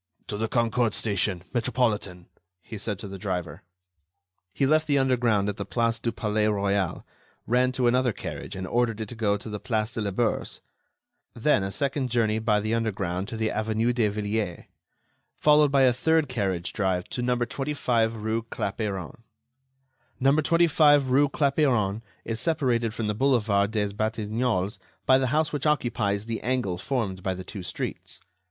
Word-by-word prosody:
"To 105 - -3
the 110 +1 -1
Concorde 115 -1 +1
station, 100 -4 0
Metropolitan," 115 -7 -1 0.4
he 110 - -9
said 105 -1 -3
to 100 - -7
the 95 0 -8
driver. 90 -6 -4 0.9
He 135 - 0
left 155 +3 +3
the 145 -2 +3
underground 120 -6 +2
at 105 0 -3
the - - -3
Place 115 -1 0
du 115 - -1
Palais 105 -1 0
Royal, 100 -3 0 0.4
ran 125 +2 +2
to 130 -1 0
another 125 +1 +3
carriage - - -7
and 95 0 -4
ordered 115 +1 0
it 110 -2 -4
to - - -7
go 105 -2 +1
to 100 - -10
the 105 -1 -5
Place 110 -2 -1
de 115 - -3
la 105 - -1
Bourse. 110 +4 -1 0.8
Then 120 -1 +2
a 95 - -2
second 140 +1 -1
journey 110 -2 +1
by 110 -2 +2
the 110 +2 -2
underground 100 -5 -1
to 115 -1 -6
the 110 0 0
Avenue 110 +2 0
de 120 -3 +2
Villiers, 105 -2 -2 0.7
followed 150 -1 +5
by 140 -1 +4
a 125 -2 +5
third 160 +4 +2
carriage 95 -8 -2
drive 95 -3 0
to 125 - -4
number 125 0 +1
25 125 -5 0
rue 110 +1 -1
Clapeyron. 100 -4 -4 1.0
Number 140 +4 +4
25 150 -4 +4
rue 140 +2 +4
Clapeyron 135 -8 +1 0.2
is 115 0 -3
separated 120 -8 0
from 115 - -2
the 105 - 0
Boulevard 105 -5 +2
des 105 -2 -1
Batignolles 110 -1 -1 0.3
by 130 0 +5
the 130 - +1
house 155 +4 +1
which 145 +1 -1
occupies 115 -8 0
the 115 -1 -3
angle 120 -8 -1
formed 105 -6 -2
by 95 0 -2
the 95 - -7
two 100 +1 -7
streets. 90 - -6
115 Hz, 170 wpm, -26 LUFS, 105-130 Hz, 1.0 s, followed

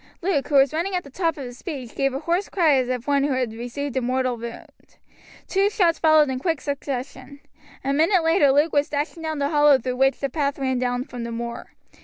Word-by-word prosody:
Luke, 340 -7 0
who 295 - -1
was 275 0 +5
running 355 +4 -1
at 360 - -1
the 280 - -14
top 330 0 -1
of 280 - -6
his 245 -1 -9
speed, 270 -9 -7
gave 275 0 0
a 265 - -3
hoarse 345 +5 -1
cry 330 -6 +3
as 255 -1 0
of 250 -1 -3
one 280 -1 +2
who 285 -1 +1
had 250 -4 -1
received 245 +4 -5
a 260 - +1
mortal 255 0 0
wound. 235 0 -11 0.5
Two 395 +1 +2
shots 350 -5 +1
followed 310 -3 +4
in 255 - -3
quick 325 +1 -1
succession. 280 -1 -5 0.4
A 275 +1 0
minute 330 +5 +3
later 325 -4 +4
Luke 295 +4 +2
was 290 0 +2
dashing 300 +3 -3
down 315 -1 -3
the 280 0 0
hollow 295 -2 +5
through 250 0 -4
which 270 +1 +2
the 275 - -1
path 280 +1 -2
ran 260 -2 -1
down 245 0 -1
from 245 -3 -8
the 235 - -5
moor. 235 +1 -6
280 Hz, 235 wpm, -23 LUFS, 255-315 Hz, 0.5 s, was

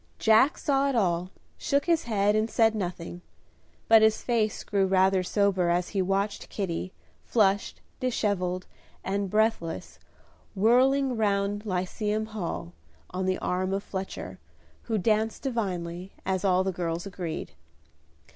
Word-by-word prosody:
Jack 225 +7 +4
saw 280 -1 +1
it 270 - -1
all, 180 -4 +1 0.3
shook 280 0 +1
his 335 -2 +2
head 210 -2 +2
and 215 +1 +1
said 225 -1 +3
nothing; 175 -3 -5 0.7
but 225 -1 +7
his 220 0 +3
face 225 -4 0
grew 195 -2 +1
rather 190 0 +3
sober 190 -1 +1
as 175 +1 +1
he 195 - 0
watched 195 +2 -1
Kitty, 185 -2 -3 0.3
flushed, 200 -3 +1 0.2
dishevelled, 190 -7 -1 0.4
and 200 0 -1
breathless, 210 - -1 0.6
whirling 255 +5 +3
round 205 -1 0
Lyceum 210 +3 -1
Hall, 175 -5 -5 0.4
on 185 +1 -2
the 185 - +1
arm 185 +1 -1
of 200 +1 -2
Fletcher, 190 0 -6 0.5
who 220 - +1
danced 215 +3 0
divinely, 185 -7 -3
as 190 -1 -1
all 185 -1 +3
the 190 - -1
girls 170 0 -3
agreed. 180 -5 -5
200 Hz, 135 wpm, -27 LUFS, 185-220 Hz, 0.7 s, but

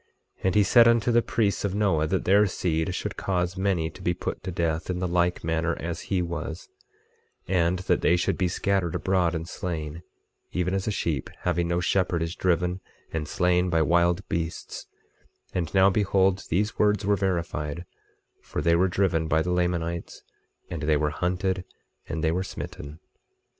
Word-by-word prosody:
25:12 - - -9
And 95 - +2
he 105 - +6
said 115 +4 +6
unto 115 0 +3
the 120 0 +5
priests 110 -4 0
of 100 -1 -1
Noah 90 -7 +2
that 95 +4 -1
their 100 +3 +5
seed 85 -1 -1
should - - -4
cause 90 -1 -1
many 95 -4 0
to - - -14
be 90 -1 0
put - - -4
to 95 - -5
death, 85 -1 -1
in 90 - -1
the 90 0 -1
like 90 0 +1
manner 80 0 0
as 85 0 -4
he 95 -3 +1
was, 85 0 -5 0.8
and 90 -1 +2
that - - +2
they 85 - +4
should 90 - 0
be 90 - +1
scattered 95 -1 0
abroad 90 -3 +1
and 80 0 -4
slain, 80 -3 -5 0.5
even 90 0 -1
as 95 +1 -1
a - - +1
sheep 80 -9 -2
having 85 -1 0
no 85 0 0
shepherd 90 -1 +1
is 80 +1 -3
driven 90 0 0 0.3
and 80 -2 -2
slain 90 +2 +2
by 80 -2 +3
wild 85 +4 +2
beasts; 85 0 -4 0.7
and 85 -3 -2
now 95 0 +6
behold, 95 -1 +2
these 105 +6 0
words 105 0 +2
were 100 0 +3
verified, 85 -4 -2 0.6
for - - -5
they 85 0 +3
were 90 +3 +3
driven 90 -3 +1
by 80 +1 +2
the 90 - -2
Lamanites, 85 -1 -2 0.4
and 80 - -5
they 75 +1 +2
were 75 0 0
hunted, 90 +3 -1 0.5
and 80 -1 -3
they 80 - +3
were 90 +3 0
smitten. 75 -4 -7
90 Hz, 185 wpm, -26 LUFS, 85-95 Hz, 0.8 s, he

